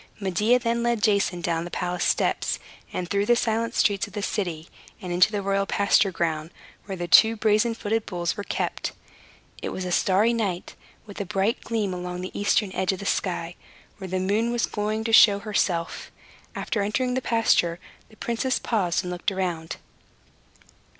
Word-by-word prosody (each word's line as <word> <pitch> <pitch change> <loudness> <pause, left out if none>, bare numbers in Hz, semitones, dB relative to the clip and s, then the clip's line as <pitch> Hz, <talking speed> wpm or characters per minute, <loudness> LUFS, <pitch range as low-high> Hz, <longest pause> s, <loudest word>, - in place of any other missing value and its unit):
Medea 210 +5 +2
then 235 -1 -1
led 235 -3 0
Jason 200 -4 +2
down 165 -1 -1
the 175 - -6
palace 175 0 -2
steps, - - +1 0.3
and 180 - -3
through 200 +2 0
the 240 - +5
silent 230 0 -1
streets 200 -1 +2
of 205 - -16
the 205 -1 -4
city, 175 -7 -3 0.3
and 180 -1 -5
into 180 +4 +4
the 205 -2 -2
royal 195 0 0
pasture 200 0 +3
ground, 160 -2 -2 0.4
where 195 - -5
the 175 -1 -4
two 220 +6 +7
brazen 215 +1 +2
footed 225 0 -2
bulls 175 -2 -2
were 205 - -5
kept. - - -3 0.7
It - - -3
was 185 - -4
a 180 - -3
starry 205 +5 +3
night, 195 -6 -2 0.3
with 205 -1 -7
a - - -3
bright 195 +5 0
gleam 215 -5 -2
along 180 0 -5
the 185 - -5
eastern 205 0 +1
edge 185 0 +1
of 190 - -4
the 200 - -7
sky, 175 -4 -1 0.5
where 190 - -6
the 185 +1 -2
moon 210 +5 +1
was 240 -1 -1
soon - - -1
going 215 +1 -2
to 225 0 -2
show 205 -3 +8
herself. 195 -5 -2 0.4
After 215 - -2
entering 250 +5 0
the 260 - 0
pasture, 220 -8 +2 0.3
the 220 - -19
princess 235 +4 -1
paused 180 -7 0
and 180 - -4
looked 180 +2 -2
around. 175 -4 -3
200 Hz, 185 wpm, -25 LUFS, 180-220 Hz, 0.7 s, show